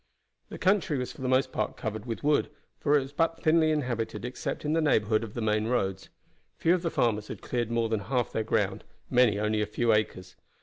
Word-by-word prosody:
The - - -7
country 185 -6 +2
was 125 -1 -3
for - - -13
the 130 - -2
most 130 +1 +2
part - - -2
covered 110 0 -5
with 115 +3 -4
wood, 150 0 +2 0.3
for 150 0 +3
it - - +2
was 135 +1 -8
but 165 +1 0
thinly 160 0 +4
inhabited 125 -7 -2
except 125 +4 -4
in 150 - +1
the 165 - +2
neighborhood 110 -7 +2
of 110 -2 -8
the 120 - -2
main 110 0 +1
roads. 95 -5 -1 0.5
Few 165 - +3
of 180 - +1
the 170 - -1
farmers 105 -7 0
had - - -8
cleared 120 -2 -2
more 115 -1 +1
than 110 -1 0
half 125 +3 -1
their 110 - -1
ground; 105 -2 0 0.3
many 120 -5 +4
only 105 +1 0
a 105 - 0
few 115 +2 +1
acres. 95 -4 -1
120 Hz, 225 wpm, -28 LUFS, 105-145 Hz, 0.5 s, thinly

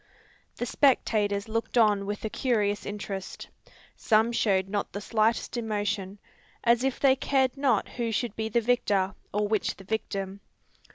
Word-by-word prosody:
The 240 - -3
spectators 215 -6 +2
looked 225 +2 -2
on 205 -3 +4
with 205 +1 -4
a - - -1
curious 210 -5 0
interest. 200 -2 -6 0.5
Some 220 +1 +2
showed 195 -5 +1
not 205 0 -3
the 200 - -3
slightest 220 +3 0
emotion, 205 -3 -2 0.5
as 235 +1 +3
if 270 -1 -1
they 270 -2 +5
cared 265 -1 +1
not 265 -7 +1
who 235 -2 -3
should 225 0 -2
be 220 0 -2
the 235 +2 +2
victor, 205 -5 +1 0.2
or 210 0 0
which 215 -1 0
the 195 - -13
victim. 195 -2 -3
215 Hz, 155 wpm, -27 LUFS, 200-235 Hz, 0.5 s, they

